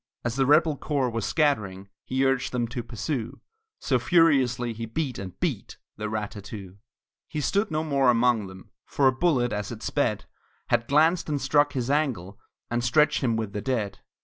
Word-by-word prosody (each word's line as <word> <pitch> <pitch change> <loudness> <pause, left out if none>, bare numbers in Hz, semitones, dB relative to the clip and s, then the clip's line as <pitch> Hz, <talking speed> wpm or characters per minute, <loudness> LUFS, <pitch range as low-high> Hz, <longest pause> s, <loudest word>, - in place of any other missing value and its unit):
As 120 0 -1
the 135 -1 +2
rebel 155 0 +4
corps 135 -5 -1
was 115 -3 -2
scattering 105 - 0 0.2
He 130 +1 0
urged 135 -1 +1
them 120 -2 -1
to 120 0 -4
pursue, 120 +1 -4 0.4
So 130 -3 0
furiously 130 -4 +3
he 115 +1 -6
beat, 130 -1 -3
and 95 -2 -8
beat - - -3 0.2
The 105 0 -3
rat 105 -1 -3
tat 100 - -9
too! 100 -2 -9 0.5
He 155 - -4
stood 200 +9 0
no 155 0 -1
more 140 -4 +2
among 120 -3 +3
them, 95 -1 -13 0.2
For 140 - +2
a - - +6
bullet, 130 -6 +1
as 105 +1 -3
it 110 -2 -8
sped, - - -1 0.4
Had 115 - +1
glanced 160 +4 +3
and 145 -1 0
struck 145 +2 +2
his 130 -1 -1
ankle, 115 - -1 0.3
And 120 0 0
stretched 150 +5 +3
him 115 -3 +2
with 110 -3 -4
the 105 - -3
dead! 110 -6 -2
125 Hz, 190 wpm, -26 LUFS, 110-145 Hz, 0.5 s, a